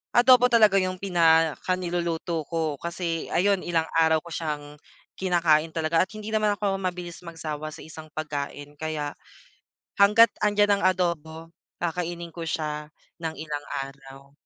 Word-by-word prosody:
adobo 250 Hz, 0 st, +7 dB
talaga 220 Hz, -5 st, +5 dB
yung 185 Hz, 0 st, -1 dB
pinaka 165 Hz, -2 st, +3 dB
niluluto 170 Hz, -2 st, -2 dB
ko 160 Hz, -3 st, -2 dB
kasi 170 Hz, -1 st, -3 dB
ayun 195 Hz, +2 st, +3 dB
ilang 165 Hz, -2 st, 0 dB
araw 160 Hz, -1 st, +4 dB
ko 170 Hz, -, -11 dB
siyang 155 Hz, -2 st, -3 dB, 0.6 s
kinakain 165 Hz, -4 st, +2 dB
talaga 165 Hz, 0 st, +1 dB
at -, -, -34 dB
hindi 215 Hz, 0 st, -7 dB
naman 215 Hz, -1 st, +2 dB
ako 200 Hz, -1 st, -1 dB
mabilis 180 Hz, -2 st, -4 dB
magsawa 155 Hz, -2 st, -5 dB
sa -, -, -11 dB
isang 160 Hz, 0 st, -10 dB
pagkain 145 Hz, -1 st, -5 dB
kaya, 155 Hz, -2 st, -3 dB, 0.9 s
hangga't 210 Hz, +2 st, +7 dB
andiyan 205 Hz, -1 st, +3 dB
ang -, -, -5 dB
adobo 165 Hz, -3 st, -3 dB, 0.3 s
kakainin 170 Hz, 0 st, -3 dB
ko 170 Hz, -, -6 dB
siya 150 Hz, -1 st, -3 dB, 0.3 s
ng 160 Hz, -1 st, -3 dB
ilang 150 Hz, -2 st, -5 dB, 0.2 s
araw. 135 Hz, 0 st, -14 dB
165 Hz, 140 wpm, -26 LUFS, 155-185 Hz, 0.9 s, adobo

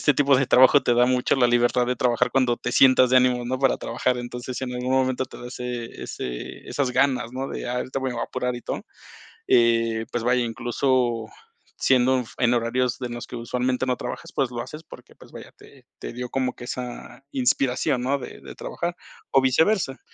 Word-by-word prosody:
este 150 Hz, -, +4 dB
tipo 140 Hz, 0 st, +4 dB
de 135 Hz, -, +1 dB
trabajo 130 Hz, +3 st, +6 dB
te 120 Hz, -, +2 dB
da 120 Hz, +1 st, +4 dB
mucho 125 Hz, +1 st, +2 dB
la 125 Hz, -, +4 dB
libertad 120 Hz, 0 st, +2 dB
de 125 Hz, -, 0 dB
trabajar 125 Hz, -3 st, +1 dB
cuando 125 Hz, -3 st, +2 dB
te 120 Hz, -, -4 dB
sientas 130 Hz, -1 st, +6 dB
de 130 Hz, -, +5 dB
ánimo, 125 Hz, -1 st, +3 dB
¿no?, 130 Hz, +2 st, -2 dB
para 135 Hz, -1 st, +3 dB
trabajar, 125 Hz, -1 st, -1 dB
entonces 120 Hz, 0 st, -6 dB
si 130 Hz, -, -3 dB
en 125 Hz, -, -5 dB
algún 125 Hz, +1 st, -3 dB
momento 130 Hz, -1 st, +1 dB
te -, -, -12 dB
da 120 Hz, -, -8 dB
ese 125 Hz, -1 st, -6 dB
ese -, -, -6 dB
esas 135 Hz, -3 st, -1 dB
ganas, 125 Hz, -2 st, +1 dB
¿no? 135 Hz, +1 st, -4 dB
De: -, -, -5 dB
"Ay, 125 Hz, -, -2 dB
ahorita 130 Hz, +2 st, -3 dB
me 130 Hz, 0 st, -2 dB
voy 120 Hz, -, -4 dB
a -, -, 0 dB
apurar 125 Hz, -1 st, -3 dB
y 120 Hz, -, -9 dB
todo", -, -, -5 dB, 0.6 s
eh, 115 Hz, -1 st, +3 dB
pues 120 Hz, -, -1 dB
vaya, 125 Hz, +1 st, +2 dB
incluso 120 Hz, 0 st, 0 dB, 0.5 s
siendo 130 Hz, 0 st, +3 dB
en 130 Hz, -, +2 dB
f 115 Hz, -, -14 dB
en 120 Hz, -1 st, +3 dB
horarios 120 Hz, +1 st, 0 dB
de 125 Hz, -, -3 dB
los 120 Hz, 0 st, -6 dB
que -, -, -11 dB
usualmente 125 Hz, +2 st, -1 dB
no 125 Hz, -1 st, 0 dB
trabajas, -, -, -7 dB
pues 135 Hz, -4 st, 0 dB
lo 120 Hz, -, -4 dB
haces 155 Hz, +6 st, -10 dB
porque, -, -, -14 dB
pues -, -, -17 dB
vaya, -, -, -10 dB
te -, -, -18 dB
te -, -, -7 dB
dio 125 Hz, +1 st, -6 dB
como 130 Hz, -2 st, -1 dB
que 120 Hz, -, -10 dB
esa 125 Hz, 0 st, -7 dB
inspiración, 125 Hz, -1 st, +1 dB
¿no? 140 Hz, +2 st, 0 dB
De -, -, -9 dB
de -, -, -11 dB
trabajar, 175 Hz, 0 st, -4 dB, 0.4 s
o 135 Hz, -, +6 dB
viceversa. 140 Hz, +2 st, +2 dB
125 Hz, 220 wpm, -24 LUFS, 120-130 Hz, 0.6 s, trabajo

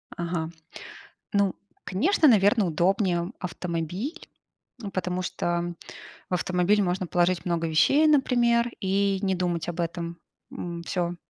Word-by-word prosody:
Ага. 170 Hz, -2 st, -3 dB, 0.8 s
Ну, 200 Hz, -2 st, +2 dB, 0.3 s
конечно, 310 Hz, -, +2 dB
наверное, 210 Hz, -2 st, +4 dB
удобнее 175 Hz, +1 st, +1 dB
автомобиль, 180 Hz, -, -4 dB, 0.5 s
ну 210 Hz, -5 st, -6 dB
потому 185 Hz, -1 st, -2 dB
что 175 Hz, 0 st, -2 dB, 0.6 s
в -, -, -4 dB
автомобиль 180 Hz, +3 st, +2 dB
можно 185 Hz, 0 st, -1 dB
положить 175 Hz, +1 st, +1 dB
много 170 Hz, -2 st, 0 dB
вещей, 160 Hz, -, +4 dB
например, 240 Hz, -5 st, +3 dB
и 195 Hz, 0 st, +1 dB
не 190 Hz, -2 st, +1 dB
думать 175 Hz, -2 st, -1 dB
об 175 Hz, -, -6 dB
этом. 170 Hz, 0 st, -3 dB, 0.3 s
М. 170 Hz, -1 st, -6 dB
Всё. 175 Hz, -1 st, -2 dB
180 Hz, 120 wpm, -26 LUFS, 170-200 Hz, 0.8 s, наверное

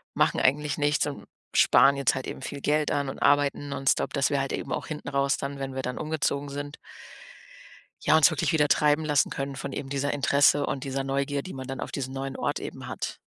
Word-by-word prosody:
machen -, -, +2 dB
eigentlich 145 Hz, +2 st, +1 dB
nichts 145 Hz, 0 st, +2 dB
und 145 Hz, -, -7 dB, 0.3 s
sparen 140 Hz, +1 st, +6 dB
jetzt 140 Hz, 0 st, +2 dB
halt 130 Hz, -, -4 dB
eben -, -, -6 dB
viel 140 Hz, -, -6 dB
Geld 150 Hz, +1 st, +1 dB
an“ 140 Hz, -1 st, 0 dB
und -, -, -7 dB
arbeiten 145 Hz, 0 st, +2 dB
nonstop, 135 Hz, -1 st, 0 dB
dass 140 Hz, -2 st, +2 dB
wir 140 Hz, -, +1 dB
halt 135 Hz, -, -3 dB
eben -, -, -4 dB
auch -, -, -4 dB
hinten 150 Hz, -2 st, -6 dB
raus 140 Hz, 0 st, +1 dB
dann, 140 Hz, 0 st, -5 dB
wenn 135 Hz, -1 st, -5 dB
wir 130 Hz, -, -2 dB
dann 125 Hz, -1 st, -4 dB
umgezogen 150 Hz, -2 st, -1 dB
sind 145 Hz, +1 st, -6 dB, 1.3 s
ja -, -, +4 dB
uns 160 Hz, +1 st, +7 dB
wirklich 155 Hz, -1 st, 0 dB
wieder 150 Hz, -2 st, +3 dB
treiben 150 Hz, +2 st, +3 dB
lassen 145 Hz, -2 st, +2 dB
können 135 Hz, 0 st, -4 dB
von 135 Hz, +1 st, -6 dB
eben 135 Hz, -, -5 dB
dieser 140 Hz, +1 st, -1 dB
Interesse 145 Hz, +1 st, +3 dB
und 135 Hz, -, -3 dB
dieser 135 Hz, -1 st, -2 dB
Neugier, 140 Hz, +1 st, -1 dB
die 185 Hz, -, -9 dB
man 130 Hz, 0 st, -6 dB
dann 135 Hz, -1 st, -5 dB
auf -, -, -5 dB
diesen 130 Hz, -2 st, -4 dB
neuen 135 Hz, 0 st, -4 dB
Ort -, -, -1 dB
eben -, -, -7 dB
hat. -, -, -5 dB
140 Hz, 225 wpm, -26 LUFS, 135-145 Hz, 1.3 s, uns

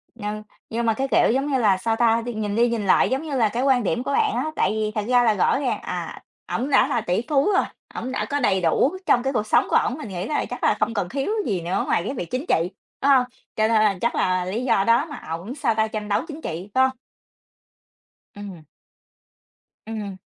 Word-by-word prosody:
Nhưng 215 Hz, -1 st, -5 dB, 0.3 s
nhưng 235 Hz, +1 st, -2 dB
mà 225 Hz, -, +3 dB
cái, 270 Hz, +5 st, -2 dB
kiểu, -, -, +4 dB
giống 270 Hz, +3 st, 0 dB
như 265 Hz, -, +2 dB
là 205 Hz, -5 st, +3 dB
sao 225 Hz, +4 st, -1 dB
ta, 230 Hz, 0 st, +3 dB
nhìn 215 Hz, -4 st, -3 dB
đi 240 Hz, +2 st, +3 dB
nhìn 230 Hz, -3 st, -2 dB
lại -, -, +4 dB
giống 265 Hz, +3 st, 0 dB
như 300 Hz, -3 st, -4 dB
là 225 Hz, -4 st, +3 dB
cái 235 Hz, +5 st, -2 dB
quan 265 Hz, -3 st, +3 dB
điểm 240 Hz, +5 st, -1 dB
của 280 Hz, -, -2 dB
bạn 430 Hz, +3 st, +2 dB
á, -, -, -1 dB
tại -, -, +2 dB
vì 215 Hz, 0 st, -1 dB
thật 210 Hz, -2 st, -1 dB
ra 245 Hz, -1 st, +5 dB
là 225 Hz, -2 st, +4 dB
rõ 205 Hz, +6 st, +2 dB
ràng 270 Hz, -3 st, -1 dB
à, -, -, -5 dB, 0.3 s
ổng 260 Hz, +4 st, -1 dB
đã 280 Hz, -, +4 dB
là 235 Hz, -, 0 dB
tỷ 185 Hz, +1 st, 0 dB
phú 290 Hz, +6 st, +3 dB
rồi, -, -, +3 dB, 0.3 s
ổng 255 Hz, -, -4 dB
đã -, -, -2 dB
có 285 Hz, -, 0 dB
đầy 195 Hz, -8 st, +2 dB
đủ 255 Hz, -, +2 dB
trong 245 Hz, -, +3 dB
cái 270 Hz, +1 st, -1 dB
cuộc 215 Hz, -3 st, -1 dB
sống -, -, +3 dB
của -, -, +1 dB
ổng, 255 Hz, -, +2 dB
mình 225 Hz, -9 st, -7 dB
nghĩ 185 Hz, +1 st, -4 dB
là 300 Hz, -, -1 dB
chắc -, -, -7 dB
là -, -, +3 dB
không 230 Hz, -, 0 dB
cần 200 Hz, -5 st, -2 dB
thiếu 275 Hz, -, -2 dB
gì 190 Hz, -5 st, -1 dB
nữa 175 Hz, +3 st, -1 dB
ngoài 170 Hz, -, +1 dB
cái 260 Hz, -, -3 dB
việc 175 Hz, -8 st, -6 dB
chính 255 Hz, +4 st, -2 dB
trị, 165 Hz, +2 st, +2 dB, 0.3 s
phải 280 Hz, -, +4 dB
hông? 250 Hz, -, +1 dB, 0.3 s
Cho 220 Hz, 0 st, +2 dB
nên -, -, -1 dB
là 215 Hz, -3 st, +3 dB
chắc 235 Hz, -, 0 dB
là 185 Hz, -1 st, +1 dB
lý 215 Hz, +7 st, -3 dB
do 230 Hz, -6 st, +3 dB
đó 230 Hz, +7 st, +3 dB
mà 295 Hz, -3 st, -9 dB
ổng 175 Hz, +10 st, -5 dB
sao 275 Hz, -6 st, 0 dB
ta, 220 Hz, 0 st, +2 dB
tranh 215 Hz, -1 st, -5 dB
đấu 205 Hz, -, +1 dB
chính 310 Hz, +1 st, -7 dB
trị, 175 Hz, -, -5 dB
phải 260 Hz, -, +4 dB
hông? 260 Hz, 0 st, -3 dB, 1.4 s
Ừm. 195 Hz, -6 st, -9 dB, 1.2 s
Ừm. 210 Hz, -3 st, -5 dB
225 Hz, 250 wpm, -23 LUFS, 205-260 Hz, 1.4 s, ra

